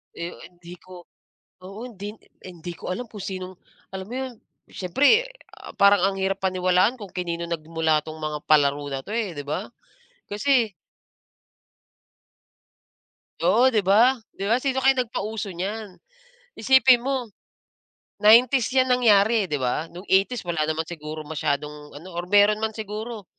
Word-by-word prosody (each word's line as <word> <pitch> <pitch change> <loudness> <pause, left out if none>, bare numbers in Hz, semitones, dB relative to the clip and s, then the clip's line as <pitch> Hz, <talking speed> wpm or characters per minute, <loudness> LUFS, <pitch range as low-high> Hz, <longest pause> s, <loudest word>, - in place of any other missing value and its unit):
Eh, 170 +1 -5 0.2
hindi 175 0 -13
ko 185 -1 -13 0.6
oo, 195 +3 -9
hindi 205 -2 -8 0.3
hindi 175 -1 -8
ko - - -8
alam 245 +6 -4
kung 210 -2 -10
sinong, 185 -1 -6 0.4
alam 190 0 -6
mo 245 - -7
'yon, 260 -1 -4 0.4
siyempre, 290 - +2 0.3
ah, - - -11
parang 200 0 +5
ang 195 0 +1
hirap 190 0 -1
paniwalaan 185 +5 +2
kung 200 -3 -9
kanino 170 -2 -3
nagmula 160 -1 0
'tong 155 0 -8
mga 155 -1 -3
palaro 145 -1 +3
na 135 - -3
'to, 210 - -8
eh, 225 -5 -2
'di 145 - -6
ba? 180 +8 -3 0.6
Kasi 225 0 +1 2.7
Oo, 230 +8 +5
'di 215 -6 0
ba? 235 +7 +5 0.2
'Di 200 +2 -4
ba, 230 - +4
sino 265 0 -1
kayang 265 -1 +3
nagpauso 215 -3 -5
niyan? 200 +3 -5 0.7
Isipin 265 -2 +5
mo, 260 -4 -2 0.9
90s 235 +3 +5
'yan 260 0 +3
nangyari, 220 -4 +3
'di 150 - -1
ba? 130 +5 -2
No'ng 180 +3 -11
80s 195 +3 +1
wala 170 -3 -2
naman 155 +1 -1
siguro 155 -2 -7
masyadong 150 -1 -3
ano, 170 +6 -12
or 175 +1 -5
meron 205 +1 +4
man 220 - 0
siguro 215 0 -7
195 Hz, 150 wpm, -24 LUFS, 170-225 Hz, 2.7 s, parang